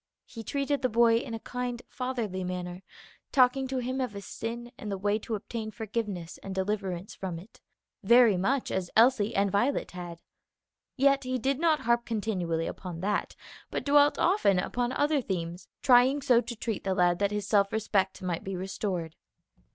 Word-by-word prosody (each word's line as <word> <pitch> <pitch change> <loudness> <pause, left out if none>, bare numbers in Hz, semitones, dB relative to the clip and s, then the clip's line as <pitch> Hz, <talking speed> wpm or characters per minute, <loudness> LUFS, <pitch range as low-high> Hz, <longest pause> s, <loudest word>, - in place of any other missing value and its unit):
He 230 - -9
treated 280 +4 -1
the 255 - +1
boy 230 0 +4
in 230 0 -4
a - - -5
kind, 250 +1 -4
fatherly 235 -8 -3
manner, 180 0 -5 0.5
talking 265 0 +4
to 260 0 -3
him 255 +2 -2
of 250 -5 -2
his 200 -1 -8
sin 235 +1 -6
and 210 -2 -6
the 195 - -2
way 205 +2 0
to 220 +1 -4
obtain 220 +1 -5
forgiveness 210 -5 -4
and 195 -1 -6
deliverance 190 -1 -2
from 185 -3 -5
it, 190 +7 -14 0.4
very 235 0 +6
much 250 +9 0
as 185 -2 -2
Elsie 225 -2 +4
and 200 0 +2
Violet 240 +8 +1
had. 175 -2 -8 0.7
Yet 275 +1 +4
he 255 0 -1
did 270 +3 0
not 320 -2 +3
harp 235 0 +2
continually 185 -8 -2
upon 175 -3 -6
that, 205 +2 -1 0.3
but - - -4
dwelt 290 0 +5
often 350 - +3
upon 245 +6 -1
other 290 +1 +1
themes, 175 -4 -4 0.2
trying 260 +3 +5
so 245 -2 +5
to 240 0 -6
treat 220 -1 -3
the 190 -1 0
lad 175 -1 +3
that 200 0 +2
his 210 -1 -3
self 200 -1 +3
respect 200 -4 0
might 175 -2 -2
be 195 0 -4
restored. 185 -3 -3
215 Hz, 180 wpm, -29 LUFS, 190-250 Hz, 0.7 s, very